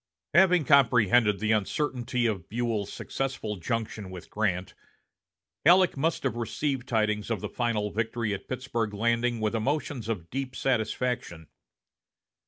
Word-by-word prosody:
Having 180 Hz, -2 st, +5 dB
comprehended 120 Hz, -6 st, +5 dB
the 110 Hz, +1 st, 0 dB
uncertainty 120 Hz, +3 st, 0 dB
of 100 Hz, -6 st, -2 dB
Buell's 115 Hz, -3 st, -2 dB
successful 130 Hz, -6 st, -4 dB
junction 110 Hz, +1 st, -3 dB
with 90 Hz, -2 st, -10 dB
Grant, 95 Hz, -4 st, -1 dB, 0.9 s
Halleck 180 Hz, +3 st, +6 dB
must 160 Hz, +4 st, 0 dB
have 135 Hz, -3 st, 0 dB
received 130 Hz, +3 st, -2 dB
tidings 110 Hz, -3 st, 0 dB
of 115 Hz, -4 st, -1 dB
the -, -, -4 dB
final 110 Hz, -4 st, -1 dB
victory 115 Hz, 0 st, -1 dB
at 100 Hz, -, -6 dB
Pittsburg 115 Hz, -4 st, -3 dB
Landing 115 Hz, +2 st, +1 dB
with 110 Hz, 0 st, 0 dB
emotions 125 Hz, 0 st, -2 dB
of 90 Hz, -7 st, -4 dB
deep 130 Hz, -1 st, -4 dB
satisfaction. 115 Hz, -, -1 dB
115 Hz, 130 wpm, -28 LUFS, 105-130 Hz, 0.9 s, Halleck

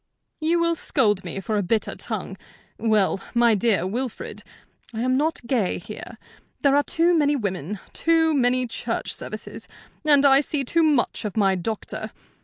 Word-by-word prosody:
"You 330 Hz, +2 st, +1 dB
will 335 Hz, 0 st, +2 dB
scold 210 Hz, -, +1 dB
me -, -, -5 dB
for 210 Hz, +2 st, -1 dB
a -, -, +1 dB
bitter 210 Hz, +4 st, 0 dB
tongue. -, -, -4 dB, 0.4 s
Well, 215 Hz, -4 st, +2 dB, 0.2 s
my 235 Hz, -1 st, +5 dB
dear 210 Hz, -4 st, +2 dB
Wilfrid, 240 Hz, +5 st, -4 dB, 0.5 s
I 225 Hz, -, -2 dB
am 255 Hz, +1 st, +1 dB
not 300 Hz, -2 st, 0 dB
gay 235 Hz, -6 st, 0 dB
here. -, -, -9 dB, 0.5 s
There 280 Hz, -1 st, +4 dB
are 290 Hz, -, +5 dB
too 335 Hz, +4 st, +2 dB
many 295 Hz, -2 st, +3 dB
women, 200 Hz, -, -3 dB, 0.2 s
too 325 Hz, -1 st, +2 dB
many 255 Hz, -2 st, +2 dB
church 230 Hz, -, -4 dB
services, -, -, -7 dB, 0.4 s
and 290 Hz, -2 st, +5 dB
I 270 Hz, 0 st, +7 dB
see 290 Hz, 0 st, -1 dB
too 330 Hz, +6 st, +1 dB
much 295 Hz, -8 st, +1 dB
of 210 Hz, -1 st, -5 dB
my 195 Hz, -2 st, +3 dB
doctor. 195 Hz, +4 st, -4 dB
245 Hz, 165 wpm, -23 LUFS, 210-295 Hz, 0.5 s, I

